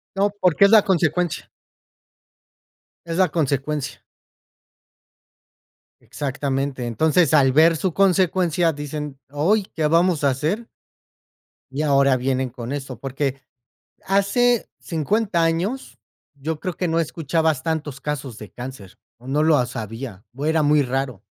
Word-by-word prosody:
No, 200 Hz, +1 st, +2 dB
porque 180 Hz, +1 st, +5 dB
es -, -, +5 dB
la 215 Hz, -2 st, +7 dB
consecuencia. 175 Hz, -2 st, 0 dB, 1.6 s
Es 165 Hz, 0 st, -4 dB
la 185 Hz, -2 st, +4 dB
consecuencia. 145 Hz, -2 st, -2 dB, 2.0 s
Exactamente. 135 Hz, -2 st, -3 dB
Entonces, 155 Hz, +6 st, +2 dB
al 135 Hz, -3 st, +5 dB
ver 160 Hz, +3 st, +5 dB
su 185 Hz, +1 st, -1 dB
consecuencia, 180 Hz, -3 st, +2 dB
dicen: 145 Hz, -1 st, -6 dB
"Oy, 180 Hz, +9 st, +2 dB
¿qué 155 Hz, -2 st, +1 dB
vamos 165 Hz, -1 st, +2 dB
a 140 Hz, -, +4 dB
hacer?" 160 Hz, -, -2 dB, 1.0 s
Y 140 Hz, -, -3 dB
ahora 140 Hz, -3 st, +3 dB
vienen 130 Hz, 0 st, -1 dB
con 120 Hz, +1 st, -7 dB
eso 135 Hz, -4 st, -5 dB
porque, 135 Hz, 0 st, -3 dB, 0.6 s
hace 215 Hz, +5 st, +2 dB
50 175 Hz, +2 st, 0 dB
años, 165 Hz, -, -2 dB, 0.4 s
yo 150 Hz, +2 st, -4 dB
creo 180 Hz, -3 st, -4 dB
que 180 Hz, -, -2 dB
no 165 Hz, +1 st, +1 dB
escuchabas 160 Hz, -2 st, 0 dB
tantos 155 Hz, -4 st, -3 dB
casos 140 Hz, -6 st, -4 dB
de 105 Hz, -3 st, -10 dB
cáncer, 125 Hz, -7 st, -9 dB, 0.2 s
o 120 Hz, +2 st, -15 dB
no 145 Hz, +3 st, +1 dB
los 140 Hz, -6 st, +2 dB
había, 115 Hz, -1 st, -7 dB
o 140 Hz, -, -4 dB
era 160 Hz, 0 st, +2 dB
muy 150 Hz, 0 st, +4 dB
raro. 130 Hz, -5 st, -2 dB
150 Hz, 130 wpm, -22 LUFS, 135-170 Hz, 2.0 s, la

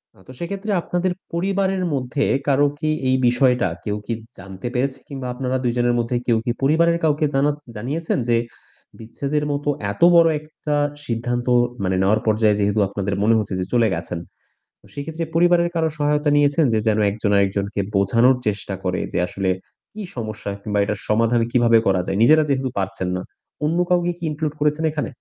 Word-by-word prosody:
না, -, -, -21 dB
তো 130 Hz, -, -10 dB
সেক্ষেত্রে 200 Hz, +4 st, -4 dB
আপনাদের 180 Hz, +2 st, -1 dB, 0.2 s
পরিবারের 190 Hz, +1 st, 0 dB
মধ্যে 135 Hz, +2 st, -1 dB, 0.2 s
কারো 145 Hz, +1 st, +4 dB
কি 155 Hz, -, -1 dB, 0.2 s
এই 130 Hz, -, +3 dB
বিষয়টা 125 Hz, -3 st, +3 dB, 0.2 s
কেউ 105 Hz, 0 st, -1 dB
কি 115 Hz, -, -2 dB, 0.2 s
জানতে 95 Hz, +3 st, -8 dB
পেরেছে? 130 Hz, +2 st, -1 dB
কিংবা 135 Hz, -3 st, -6 dB
আপনারা 130 Hz, 0 st, -2 dB
২ 120 Hz, -, +1 dB
জনের 120 Hz, 0 st, +2 dB
মধ্যে 120 Hz, +1 st, -1 dB
কেউ 115 Hz, -2 st, +3 dB
কি 120 Hz, -, +1 dB
পরিবারের 165 Hz, +4 st, +3 dB
কাউকে 150 Hz, 0 st, +2 dB
জানা 140 Hz, +2 st, +3 dB, 0.2 s
জানিয়েছেন 140 Hz, +10 st, -2 dB
যে, 115 Hz, -, +4 dB, 0.6 s
বিচ্ছেদের 140 Hz, +6 st, -3 dB
মতো 145 Hz, +1 st, -2 dB, 0.2 s
এত 100 Hz, -, -10 dB
বড় 170 Hz, -1 st, +7 dB
একটা 150 Hz, 0 st, -5 dB, 0.3 s
সিদ্ধান্ত 120 Hz, +1 st, -2 dB, 0.4 s
মানে 95 Hz, 0 st, 0 dB
নেওয়ার 105 Hz, +3 st, +2 dB
পর্যায়ে 110 Hz, -1 st, +3 dB
যেহেতু 105 Hz, +1 st, +1 dB
আপনাদের 100 Hz, 0 st, -3 dB
মনে 115 Hz, +1 st, +4 dB
হচ্ছে 105 Hz, -2 st, -3 dB
যে 90 Hz, -, -1 dB
চলে 115 Hz, -2 st, +4 dB
গেছেন, 85 Hz, +1 st, -4 dB, 0.7 s
সেক্ষেত্রে 160 Hz, +3 st, -5 dB
পরিবারের 170 Hz, 0 st, +4 dB
কারো 160 Hz, -1 st, +1 dB
সহায়তা 150 Hz, 0 st, +1 dB
নিয়েছেন 145 Hz, +1 st, +3 dB
যে 110 Hz, -, +2 dB
যেন 110 Hz, 0 st, +2 dB
একজন 105 Hz, 0 st, -2 dB
আরেকজনকে 100 Hz, +1 st, 0 dB, 0.2 s
বোঝানোর 115 Hz, +7 st, +4 dB
চেষ্টা 100 Hz, -1 st, -2 dB
করে 90 Hz, -1 st, -1 dB
যে -, -, +1 dB
আসলে 95 Hz, 0 st, -2 dB, 0.4 s
কি 215 Hz, -, -7 dB
সমস্যা 110 Hz, -3 st, -5 dB
কিংবা 105 Hz, -1 st, -1 dB
এটার 105 Hz, 0 st, -2 dB
সমাধান 115 Hz, +2 st, +2 dB
কিভাবে 120 Hz, -2 st, +4 dB
করা 95 Hz, -1 st, +3 dB
যায়? 95 Hz, -, -1 dB
নিজেরা 155 Hz, +5 st, +6 dB
যেহেতু 130 Hz, -1 st, 0 dB
পারছেন 95 Hz, -1 st, -3 dB
না, 90 Hz, -, -3 dB, 0.4 s
অন্য 165 Hz, +3 st, 0 dB
কাউকে 175 Hz, -1 st, +2 dB
কি 175 Hz, -, -13 dB
include 150 Hz, 0 st, -3 dB
করেছেন 150 Hz, +2 st, +1 dB
এখানে? 150 Hz, -1 st, -3 dB
125 Hz, 175 wpm, -21 LUFS, 105-150 Hz, 0.7 s, বড়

